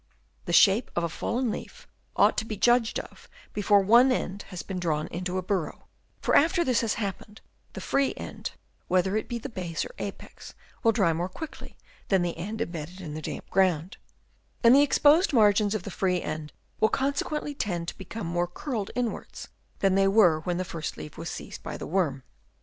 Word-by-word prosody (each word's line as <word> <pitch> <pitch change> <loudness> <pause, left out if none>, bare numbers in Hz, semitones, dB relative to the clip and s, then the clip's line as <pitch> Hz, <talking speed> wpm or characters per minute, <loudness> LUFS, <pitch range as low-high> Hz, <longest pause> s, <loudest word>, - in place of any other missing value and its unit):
The - - -3
shape 195 +7 +5
of 170 - 0
a 170 - 0
fallen 235 +7 -1
leaf - - -8 0.3
ought - - +4
to 220 - -5
be 215 -2 -5
judged 240 +1 +3
of - - -12 0.2
before 205 0 +4
one 235 +6 +6
end 200 -5 -2
has 180 -4 -7
been 190 -2 -5
drawn 155 -3 0
into 180 +2 -3
a 185 - -2
burrow, 185 -3 -3 0.3
for - - +2
after 345 +4 +4
this 255 -4 +2
has 225 -2 0
happened, 210 0 -5 0.3
the - - -6
free 275 -1 +1
end, - - -6 0.3
whether 185 +2 +2
it 215 - -2
be 240 - -2
the 235 - -6
base 175 -6 -4
or - - -10
apex, - - -8 0.3
will 225 - +4
dry 195 -7 +2
more 175 +3 -2
quickly 310 - -9 0.3
than 190 -3 +3
the 175 -1 -2
end 210 +7 -5
embedded 170 -1 -5
in 160 -5 -7
the 155 - -5
damp - - -6
ground; 185 -2 +1 0.7
and 235 +1 +8
the 280 - +7
exposed 295 +4 +4
margins 210 -2 +4
of 205 - -3
the 200 - -6
free 180 0 0
end 155 -2 -5 0.3
will 220 - +4
consequently 285 +3 -1
tend 175 -10 -3
to - - -10
become 195 +3 -6
more 175 +1 0
curled 215 - -4
inwards 245 -2 -4 0.3
than 195 -1 +3
they 195 0 +4
were 195 -6 +5
when 175 +2 -2
the 185 - -1 0.3
leaf 75 -1 -8
was - - -6
first - - -5
seized - - -8
by - - -6
the - - -6
worm. 155 -7 0
195 Hz, 200 wpm, -27 LUFS, 175-230 Hz, 0.7 s, and